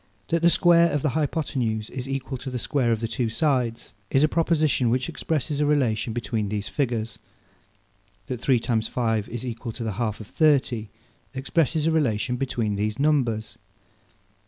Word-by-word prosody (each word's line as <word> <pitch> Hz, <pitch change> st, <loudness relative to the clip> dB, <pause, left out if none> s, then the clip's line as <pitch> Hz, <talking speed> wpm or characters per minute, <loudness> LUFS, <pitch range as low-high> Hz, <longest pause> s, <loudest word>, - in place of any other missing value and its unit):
That 170 Hz, 0 st, +1 dB
the 170 Hz, -, +6 dB
square 170 Hz, -1 st, +5 dB
of 145 Hz, -, -1 dB
the 150 Hz, -, +2 dB
hypothenuse 130 Hz, -7 st, -1 dB
is 130 Hz, 0 st, -5 dB
equal 135 Hz, -1 st, -3 dB
to 135 Hz, -, -6 dB
the 125 Hz, -, -3 dB
square 120 Hz, 0 st, 0 dB
of 115 Hz, -1 st, 0 dB
the 115 Hz, -, -1 dB
two 120 Hz, 0 st, -1 dB
sides, 125 Hz, -2 st, 0 dB, 0.2 s
is 135 Hz, -, +3 dB
a -, -, +6 dB
proposition 155 Hz, -6 st, +2 dB
which 125 Hz, +2 st, +1 dB
expresses 150 Hz, -2 st, -2 dB
a -, -, +3 dB
relation 120 Hz, -7 st, +1 dB
between 110 Hz, -2 st, -2 dB
these 105 Hz, -1 st, -3 dB
figures. 115 Hz, -5 st, -2 dB, 1.1 s
That 125 Hz, +1 st, -5 dB
three 130 Hz, -2 st, +3 dB
times 115 Hz, -1 st, 0 dB
five 115 Hz, -4 st, -1 dB
is 120 Hz, +2 st, -5 dB
equal 120 Hz, -1 st, -5 dB
to 120 Hz, -, -5 dB
the 110 Hz, -, -2 dB
half 110 Hz, -3 st, -1 dB
of 110 Hz, -, -8 dB
thirty, 130 Hz, -7 st, +2 dB, 0.5 s
expresses 155 Hz, +3 st, +1 dB
a 165 Hz, -, +3 dB
relation 125 Hz, -6 st, +1 dB
between 115 Hz, -6 st, -1 dB
these 105 Hz, +1 st, -1 dB
numbers. 130 Hz, -7 st, 0 dB
125 Hz, 175 wpm, -25 LUFS, 115-145 Hz, 1.1 s, the